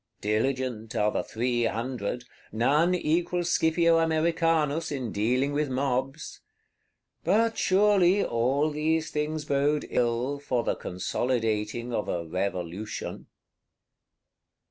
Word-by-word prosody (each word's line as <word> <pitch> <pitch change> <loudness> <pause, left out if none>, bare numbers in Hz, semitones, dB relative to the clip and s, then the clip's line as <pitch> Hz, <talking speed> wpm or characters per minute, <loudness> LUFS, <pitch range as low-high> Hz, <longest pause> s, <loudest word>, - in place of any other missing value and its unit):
_"—Diligent 115 +1 -1
are 105 0 +2
the - - -1
Three 120 +1 -1
Hundred; 120 0 -3 0.3
none 150 +11 +3
equals 175 +1 0
Scipio 165 +1 +3
Americanus 165 -1 +1
in 130 -6 -3
dealing 125 +7 +1
with 150 0 0
mobs. 135 +2 -2 0.8
But 225 +6 +2
surely 195 -1 +4
all 135 +6 +1
these 155 +1 0
things 150 0 -2
bode 145 +1 +1
ill 125 +4 0
for 125 -4 -1
the - - 0
consolidating 115 +3 -2
of 105 - -2
a 85 -1 -2
Revolution. 95 +3 -4
135 Hz, 105 wpm, -27 LUFS, 115-160 Hz, 0.8 s, surely